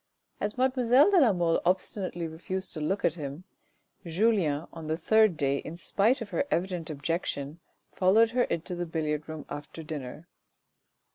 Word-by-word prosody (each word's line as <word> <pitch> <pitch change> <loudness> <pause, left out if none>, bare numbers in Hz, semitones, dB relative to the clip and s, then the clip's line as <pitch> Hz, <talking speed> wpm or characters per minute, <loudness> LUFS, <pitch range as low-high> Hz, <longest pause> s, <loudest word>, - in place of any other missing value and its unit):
As 210 - -3
mademoiselle 255 - +4
de 375 -4 +6
la 245 -6 +6
Mole 175 -3 +1
obstinately 180 -1 -1
refused 185 +4 -5
to 155 - -5
look 190 +7 0
at 160 - +3
him, 150 0 -6 0.6
Julien 170 -4 +1
on 160 -2 -8
the 160 +1 -1
third 215 0 +4
day 140 -1 +1
in 155 - -7
spite 210 - +1
of 220 - -6
her - - +1
evident 175 -2 -1
objection, 150 0 -3 0.3
followed 220 +5 +4
her 245 +1 +2
into 170 +2 -3
the 175 0 -3
billiard 155 -2 -2
room 155 -1 -6
after 145 +2 -8
dinner. 150 +1 -7
170 Hz, 160 wpm, -28 LUFS, 155-205 Hz, 0.6 s, de